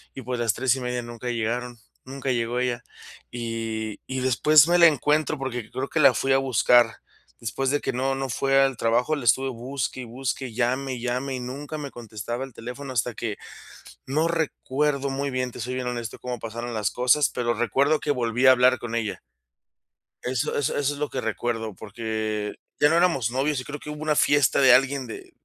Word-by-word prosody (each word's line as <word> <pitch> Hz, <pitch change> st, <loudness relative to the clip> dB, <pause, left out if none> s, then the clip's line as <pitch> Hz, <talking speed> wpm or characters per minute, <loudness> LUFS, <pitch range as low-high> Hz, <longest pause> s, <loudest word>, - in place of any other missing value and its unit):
Y 135 Hz, -, -7 dB
pues 125 Hz, 0 st, -3 dB
las 115 Hz, -3 st, +2 dB
3 130 Hz, 0 st, +2 dB
y -, -, -5 dB
media 125 Hz, -1 st, -2 dB
nunca 120 Hz, +1 st, -6 dB
llegaron, 120 Hz, +1 st, -2 dB, 0.3 s
nunca 135 Hz, 0 st, -3 dB
llegó 120 Hz, 0 st, -1 dB
ella. 125 Hz, -1 st, -1 dB, 0.5 s
Y 115 Hz, -2 st, -4 dB
y 130 Hz, -1 st, -3 dB
después 145 Hz, +4 st, +5 dB
me 175 Hz, -, +5 dB
la 170 Hz, -1 st, +9 dB
encuentro 150 Hz, +1 st, +1 dB
porque 125 Hz, -4 st, -4 dB
creo 135 Hz, +1 st, -3 dB
que 160 Hz, -, -1 dB
la 140 Hz, -, +7 dB
fui 135 Hz, -, 0 dB
a -, -, +5 dB
buscar. 120 Hz, -3 st, +4 dB, 0.4 s
Después 130 Hz, +4 st, -2 dB
de 145 Hz, +1 st, +1 dB
que -, -, -2 dB
no 135 Hz, +2 st, 0 dB
no 135 Hz, -1 st, -3 dB
fue 135 Hz, +2 st, +2 dB
al 135 Hz, -3 st, +2 dB
trabajo, 120 Hz, +7 st, +1 dB
la 135 Hz, -5 st, -6 dB
estuve 135 Hz, +4 st, +3 dB
busque 130 Hz, +2 st, -4 dB
y -, -, -6 dB
busque 130 Hz, +2 st, -3 dB
y 110 Hz, -, -11 dB
llame 130 Hz, +2 st, 0 dB
y 120 Hz, -, -8 dB
llame 125 Hz, +2 st, -2 dB
y -, -, -4 dB
nunca 140 Hz, +5 st, -6 dB
me 145 Hz, -2 st, -6 dB
contestaba 120 Hz, +2 st, -5 dB
el 130 Hz, -, -14 dB
teléfono 125 Hz, +4 st, -7 dB
hasta 120 Hz, 0 st, 0 dB
que, 110 Hz, -2 st, -4 dB, 0.7 s
no 155 Hz, +5 st, +1 dB
recuerdo 145 Hz, -3 st, -1 dB
muy 140 Hz, +1 st, -2 dB
bien, 130 Hz, -1 st, -2 dB
te -, -, -9 dB
soy 125 Hz, +2 st, -3 dB
bien 130 Hz, -1 st, -3 dB
honesto, 120 Hz, -2 st, -4 dB
cómo 125 Hz, -1 st, -5 dB
pasaron 115 Hz, +1 st, -5 dB
las 105 Hz, -2 st, 0 dB
cosas, 125 Hz, +4 st, +3 dB
pero 120 Hz, -1 st, -1 dB
recuerdo 135 Hz, +7 st, +2 dB
que 150 Hz, -, -2 dB
volví 125 Hz, -1 st, +1 dB
a 130 Hz, -, +10 dB
hablar 125 Hz, 0 st, +4 dB
con 120 Hz, -1 st, -5 dB
ella. 110 Hz, -3 st, -2 dB, 1.0 s
Eso 125 Hz, -1 st, -1 dB
eso 145 Hz, -, 0 dB
eso 145 Hz, 0 st, +1 dB
es 145 Hz, -, -9 dB
lo 150 Hz, -, -1 dB
que 130 Hz, -, -3 dB
recuerdo, 115 Hz, -1 st, -2 dB
porque 110 Hz, 0 st, -3 dB, 0.3 s
ya 145 Hz, -, +5 dB
no 165 Hz, -, +3 dB
éramos 135 Hz, -10 st, +2 dB
novios 135 Hz, +2 st, 0 dB
y -, -, -5 dB
creo 145 Hz, +2 st, -7 dB
que 150 Hz, -, -9 dB
hubo 150 Hz, 0 st, -7 dB
una 155 Hz, -1 st, +1 dB
fiesta 145 Hz, -4 st, +4 dB
de 130 Hz, -2 st, +7 dB
alguien 135 Hz, 0 st, +2 dB
de 110 Hz, -, -9 dB
125 Hz, 210 wpm, -25 LUFS, 120-135 Hz, 1.0 s, a